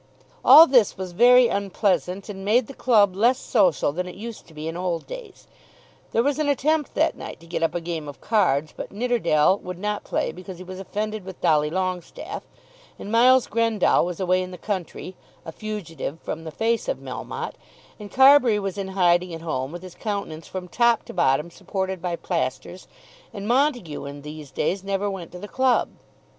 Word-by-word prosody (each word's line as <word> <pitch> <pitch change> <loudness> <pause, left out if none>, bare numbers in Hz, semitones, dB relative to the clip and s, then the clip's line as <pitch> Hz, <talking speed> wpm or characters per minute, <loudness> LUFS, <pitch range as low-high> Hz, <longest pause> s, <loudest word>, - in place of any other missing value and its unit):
All 320 - +10
this 250 -8 +3
was 185 -1 -5
very 245 +6 +6
unpleasant 195 -2 -1
and 195 -2 -7
made 225 +5 +3
the 275 - -10
club 210 -8 +3
less 240 +6 +3
social 185 - +2
than 180 +4 -4
it 180 - -8
used 230 +2 -8
to 165 - -17
be 155 +1 -6
in 165 - -4
old 175 -2 -2
days. - - -10 0.7
There 230 - +2
was 285 +2 0
an 300 -1 +1
attempt 295 +2 0
that - - +2
night - - -8
to 170 - -16
get 170 0 -4
up 165 0 0
a - - 0
game 165 -3 -5
of 145 - -9
cards; 155 -9 +1
but - - -7
Nidderdale 200 -6 +2
would 180 -1 -7
not 210 +2 -3
play - - -1
because 185 0 -10
he 185 - -9
was 185 +1 -9
offended 210 +2 -4
with 190 -1 -10
Dolly 150 -1 +2
Longestaffe; 185 +1 -4 0.5
and 205 - -7
Miles 250 +2 +5
Grendall 230 -3 +2
was 175 -1 -4
away 185 -1 +2
in 185 - -5
the 180 - -9
country, 185 -1 -5 0.3
a 165 - -6
fugitive 165 -7 -6
from 165 +1 -6
the 160 - -6
face 225 +7 -1
of - - -1
Melmotte, - - -6 0.5
and 205 -1 -9
Carbury 265 -4 +6
was 195 -1 -3
in 195 - -3
hiding 175 -1 +3
at 165 - -9
home 135 -4 -3
with 175 +1 -8
his 185 -2 -10
countenance 200 -7 -5
from 185 -1 -6
top 235 +4 +2
to - - -9
bottom 160 -1 +1
supported 190 0 -4
by 175 -1 -2
plasters, - - -4 0.5
and 200 0 -5
Montague 245 - 0
in 140 0 -8
these 150 -1 -9
days 185 +8 -2
never 200 +1 -1
went 180 -4 -7
to - - -7
the 205 - -8
club. 260 +2 +2
190 Hz, 195 wpm, -24 LUFS, 170-225 Hz, 0.7 s, All